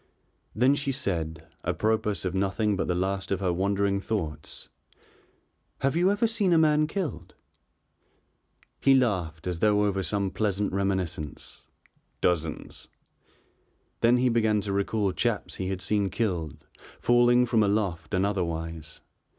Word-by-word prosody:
Then 125 +5 +4
she 140 -1 -1
said, 80 - -3 0.2
apropos 110 -2 0
of 90 - -3
nothing 100 +2 0
but 95 - -2
the 90 - 0
last 95 +2 -2
of 95 - +1
her 90 -3 0
wandering 100 +2 +1
thoughts: 85 -9 -4 1.1
"Have 135 +2 +1
you 175 +3 +3
ever 205 +3 +2
seen 215 -5 +1
a - - +5
man 155 -1 +4
killed?" 180 0 -5 1.4
He 135 -1 +5
laughed 90 -11 0
as 90 -2 -3
though 105 +1 +3
over 100 -1 0
some 100 0 -1
pleasant 105 -2 -1
reminiscence. 95 -6 -3 0.5
"Dozens." 80 -3 -2 1.1
Then 120 +1 +4
he 125 0 +2
began 110 -2 +2
to 100 0 -3
recall 100 0 0
chaps - - -2
he 95 - -3
had 95 -1 -4
seen 100 0 +1
killed, 85 - -3 0.3
falling 120 0 +4
from 115 -2 +2
aloft 100 -3 0
and 95 +1 +2
otherwise. 80 -5 -4
100 Hz, 135 wpm, -27 LUFS, 90-115 Hz, 1.4 s, a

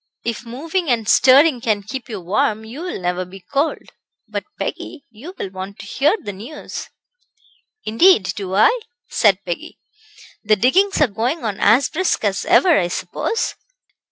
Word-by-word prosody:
"If 235 +1 -4
moving 320 +8 -3
and 230 -4 0
stirring 265 +2 +5
can 215 -3 0
keep 245 +5 -7
you 215 -3 -5
warm 210 +4 0
you 245 +8 -8
will 360 - -4
never 180 0 -1
be 185 +2 -12
cold. 290 +3 -1 0.4
But, - - -4
Peggy, 285 -4 -5
you 285 - -11
will 190 - -5
want 190 +2 -7
to - - -10
hear 285 - +2
the 205 - -6
news." 230 +11 -8 1.0
"Indeed 225 - +5
do 190 -2 -4
I," 465 - +4 0.3
said 200 -3 +2
Peggy; 175 -2 -5 0.7
"the 215 0 +4
diggings 370 - +2
are 295 - +6
going 240 +9 -2
on 205 -3 -3
as 245 +6 +4
brisk 370 -5 -1
as 200 -2 0
ever, 350 -1 +5
I 175 - 0
suppose?" 450 - -2
230 Hz, 160 wpm, -20 LUFS, 200-305 Hz, 1.0 s, are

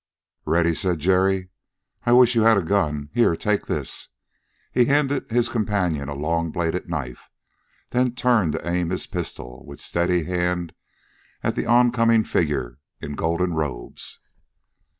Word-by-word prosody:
"Ready!" 85 +2 +2
said 90 0 0
Jerry. 95 +2 +2 0.6
"I 120 - +5
wish 125 0 +6
you 115 - +3
had 110 -1 +5
a 95 - +1
gun! 75 -6 -1
Here! 120 -8 +3
Take 105 +3 -1
this!" - - -3 0.6
He 125 -1 +3
handed 140 +1 +1
his 120 +1 +2
companion 100 - -1
a 70 - -4
long 85 +3 -1
bladed 85 +2 -2
knife, 70 -8 -5 0.6
then 125 0 +1
turned 115 -11 +2
to - - -5
aim 85 -1 0
his 95 - -2
pistol 65 0 -6
with 70 - -11
steady 85 0 0
hand 90 -1 -1 0.7
at - - 0
the - - -2
oncoming 120 -2 +4
figure 70 - -1 0.2
in 75 - -6
golden 85 +4 0
robes. 75 -7 -4
90 Hz, 145 wpm, -23 LUFS, 80-115 Hz, 0.7 s, wish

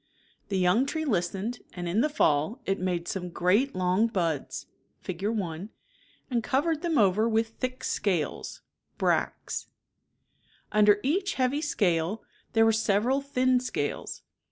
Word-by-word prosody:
The 195 - 0
young 185 +9 +3
tree 315 +2 -2
listened, 200 - -1
and 175 -1 -5
in 190 +6 +2
the 300 - +2
fall 160 - +1
it 195 - 0
made 175 -2 -1
.some 180 -2 -3
great 190 +10 +2
long 185 +4 +2
buds 170 - -2 0.3
(Fig. 185 0 -6
i) 200 -4 -2 0.6
and 235 -2 +1
covered 300 +6 +1
them 335 -3 0
over 210 +2 +4
with 225 0 +1
thick 255 +3 -5
scales 180 -8 -2 0.4
{brads) - - -1 1.0
Under 210 0 +5
each 375 +9 0
heavy 265 +3 +1
scale, 195 - 0 0.3
there 225 -1 +5
were 225 - +5
several 225 +5 +2
thin 255 -2 +2
scales. 250 - -4
215 Hz, 135 wpm, -28 LUFS, 180-255 Hz, 1.0 s, Under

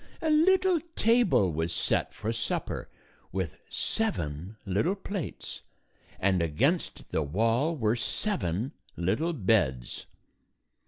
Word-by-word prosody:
A 315 - +1
little 370 +3 +5 0.2
table 220 - +4
was 80 +2 -1
set - - 0
for 110 +2 -3
supper 115 - -2 0.4
with 90 -5 -3
seven 95 - -2
little 105 - +1
plates, 195 -3 -5 0.6
and 95 -2 +2
against 130 - 0
the 80 - +1
wall 115 - +1
were 110 -3 +2
seven 115 - -1 0.3
little 95 - +1
beds. 90 - +1
115 Hz, 105 wpm, -29 LUFS, -, 0.6 s, little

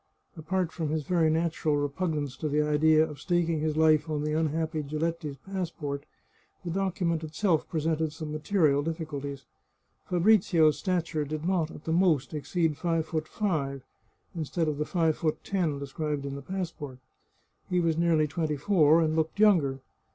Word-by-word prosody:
Apart 175 +2 -1
from 160 -3 -3
his 155 0 -1
very 165 +1 +2
natural 160 -2 +1
repugnance 145 -1 -2
to 155 - -3
the 150 +1 +2
idea 155 +1 +4
of 150 -2 -10
staking 170 -2 +1
his 155 0 -1
life 155 -1 +4
on 150 -1 -1
the 150 0 -1
unhappy 160 0 0
Giletti's 155 0 -3
passport, 165 -7 -4 0.6
the 170 - -2
docu 190 0 -1
ment 165 -1 0
itself 160 +1 0
presented 160 -1 0
some 155 0 -6
material 155 -2 +2
difficulties. 145 -3 -5 0.6
Fabrizio's 175 -4 +4
stature 170 -5 -1
did 155 +2 -5
not, 175 -4 +1
at 150 - -11
the 160 - -3
most, 165 -6 +2
exceed 155 +1 -1
five 165 -2 0
foot 155 -1 -3
five, 140 -10 -2 0.5
instead 165 0 -2
of 150 -1 -2
the 150 - 0
five 165 -3 +1
foot 155 -2 -1
ten 175 -7 -1
described 140 +1 -3
in 140 - -4
the 140 - -6
passport. 165 -6 -5 0.7
He 180 - +2
was 165 -2 +1
nearly 165 -2 +3
twenty 150 -1 -2
four, 160 -1 +4
and 155 0 0
looked 160 +4 -1
younger. 160 -11 +4
160 Hz, 165 wpm, -28 LUFS, 150-170 Hz, 0.7 s, idea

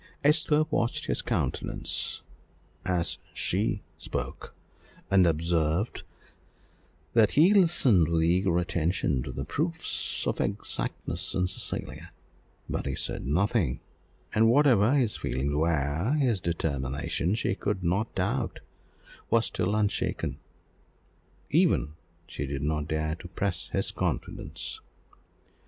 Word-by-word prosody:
Esther 150 +1 +4
watched 120 -4 0
his - - -1
countenance - - -2 0.6
as 90 -2 +1 0.2
she 100 +5 0 0.2
spoke, - - -5 0.6
and 95 -2 +6
observed 85 +4 +1 1.1
that 110 -3 +4
he 170 +7 +6
listened 140 - +5
with 80 -1 +2
eager 90 +1 +2
attention 85 -5 0
to - - -5
the 70 - -4
proofs 160 - -2
of - - 0
exactness - - -2
in 90 - +2
Cecilia; 90 - -4 0.6
but - - -3
he - - -1
said - - -2
nothing, 90 - +1 0.5
and 110 +1 +5
whatever 120 -5 +5
his 125 -7 +2
feelings 70 +3 -2
were, 80 - +1
his 125 -10 +2
determination, 80 +2 -1
she 110 - 0
could 100 -1 -2
not 100 +6 0
doubt, 95 -1 -1 0.7
was 115 -1 +4
still 100 +4 0
unshaken; 105 -1 -1 1.1
even 75 - +3 0.3
she 70 -5 -5
did 70 0 -3
not 75 0 -1
dare 80 0 -1
to 80 - -8
press - - -2
his - - 0
confidence. - - -3
90 Hz, 115 wpm, -28 LUFS, 80-115 Hz, 1.1 s, and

